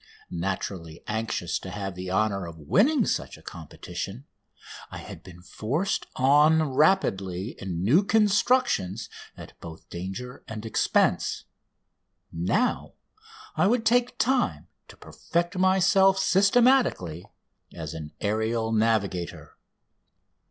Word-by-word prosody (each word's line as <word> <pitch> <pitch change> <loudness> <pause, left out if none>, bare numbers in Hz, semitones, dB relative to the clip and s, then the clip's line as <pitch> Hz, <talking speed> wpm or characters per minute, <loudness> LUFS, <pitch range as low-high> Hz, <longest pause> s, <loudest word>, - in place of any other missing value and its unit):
Naturally 85 -2 -4
anxious 105 -6 -2
to 95 - -8
have 95 0 -5
the 90 0 -6
honour 100 -1 0
of 85 -1 -10
winning 210 - +2
such - - -2
a - - -18
competition, 95 - -7 0.6
I - - -8
had - - -10
been 90 -1 -14
forced 140 - -2
on 150 +4 +4
rapidly 110 - +1
in 90 -3 -4
new 145 - +4
constructions 210 - +2 0.3
at - - -11
both 80 -1 -11
danger 95 +8 -7
and 110 0 -7
expense. 110 - +1 0.9
Now 90 - 0 0.6
I - - +3
would 225 +1 +1
take 245 +2 +2
time 260 +1 0 0.2
to - - -15
perfect 175 +2 -3
myself 190 +1 +4
systematically 200 - +3 0.4
as 80 -2 -7
an 75 -2 -7
aerial 110 +2 -1
navigator. 110 -6 -1
110 Hz, 110 wpm, -26 LUFS, -, 0.9 s, on